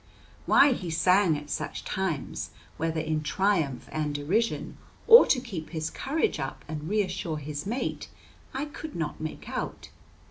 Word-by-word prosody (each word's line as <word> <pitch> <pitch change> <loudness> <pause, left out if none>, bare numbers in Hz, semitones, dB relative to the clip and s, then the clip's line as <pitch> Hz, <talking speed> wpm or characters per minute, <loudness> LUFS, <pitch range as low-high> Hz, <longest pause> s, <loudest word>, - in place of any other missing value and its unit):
Why 280 -1 +7
he 180 -7 -5
sang 180 0 +4
at 150 0 -9
such - - -4
times, 185 -7 -2 0.3
whether 165 0 -1
in 155 -1 -1
triumph 160 - 0
and 150 -2 -2
derision, 190 +11 0 0.3
or 465 +1 +10
to 260 - +3
keep 195 -11 -6
his 160 -2 -3
courage 310 +4 -1
up 135 0 -5
and 155 +1 -5
reassure 185 -5 -1
his 145 +2 -5
mate, 240 +5 -3 0.4
I 270 +3 -2
could 300 +1 -8
not 160 -2 -3
make 155 0 -6
out. - - -5
165 Hz, 150 wpm, -28 LUFS, 155-210 Hz, 0.4 s, or